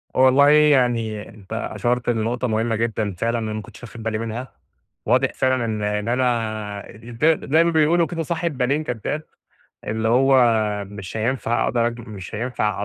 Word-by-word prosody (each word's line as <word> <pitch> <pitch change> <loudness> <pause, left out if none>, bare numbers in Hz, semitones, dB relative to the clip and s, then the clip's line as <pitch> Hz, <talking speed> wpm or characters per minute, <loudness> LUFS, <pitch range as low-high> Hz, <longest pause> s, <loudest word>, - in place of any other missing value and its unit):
والله 130 +2 +6
يعني 120 -8 +3
أنتَ 100 -3 -11
أَشرت 120 0 -1
لنقطة 120 +2 0
مهمة 115 +1 0
جدًا 110 -3 -2
فعلًا 115 +1 0
أنا 110 -1 -3
ماكنتش 110 +3 -8
واخد 115 -1 -9
بالي 110 -1 -1
منها، 115 +3 -5 0.6
واضح 130 +4 +3
فعلًا 130 -2 +1
إن 110 -2 -2
إن 105 +1 -1
أنا 110 -5 -1
زي 115 +1 -11 0.2
زي 160 +4 +3
ما 170 - +2
بيقولوا 160 +2 +3
كده 165 -2 -3
صاحب 165 -3 -3
بالين 140 +5 +1
كداب، 145 +5 -3 0.6
اللي 110 +1 -1
هو 135 +3 +4 0.5
مش 100 0 -8
هينفع 120 +1 0
أقدر 120 -1 +1
أجمع 120 0 -5
مش 95 -2 -8
هينفع 105 -3 -2
120 Hz, 160 wpm, -22 LUFS, 110-130 Hz, 0.6 s, والله